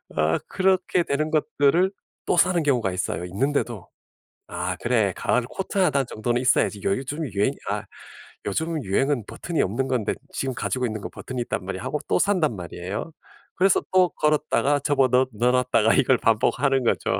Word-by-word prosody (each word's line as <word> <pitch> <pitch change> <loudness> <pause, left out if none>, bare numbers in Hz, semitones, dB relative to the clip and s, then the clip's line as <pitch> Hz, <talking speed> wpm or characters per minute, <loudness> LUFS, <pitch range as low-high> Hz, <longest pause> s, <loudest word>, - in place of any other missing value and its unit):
아 80 +1 +2
그렇게 185 -2 +1
되는 155 +1 -1
것들을 160 +2 +2 0.3
또 - - +1
사는 180 0 +4
경우가 125 -9 +1
있어요 90 -1 -3
있는데도. 120 +1 -2 0.6
'아 90 +1 -3
그래 110 -4 +1
가을 125 - +1
코트 190 +11 -5
1 140 -7 +3
정도는 120 0 -2
있어야지. 120 -4 +2
요즘 135 +9 -1
유행이 115 +3 0
아 105 +1 -1 0.6
요즘 160 +8 -2
유행은 125 +6 0
버튼이 170 +7 -3
없는 120 +8 -1
건데 125 -6 0 0.2
지금 135 -1 -2
가지고 125 +1 -2
있는 110 -3 -4
건 - - -6
버튼이 130 -1 -6
있단 120 - -3
말이야.' 95 +1 -5
하고 135 +4 -2
또 - - +2
산단 175 - +2
말이에요. 95 - -6 0.4
그래서 190 +1 +3
또 185 -1 +5
걸었다가 150 -2 +1
접어 140 -1 +2
넣 125 +1 +3
넣어 120 +4 +2
놨다가 125 -3 +3
이걸 130 - +4
반복하는 130 +4 +2
거죠. 115 - 0
130 Hz, 360 characters per minute, -24 LUFS, 110-150 Hz, 0.6 s, 또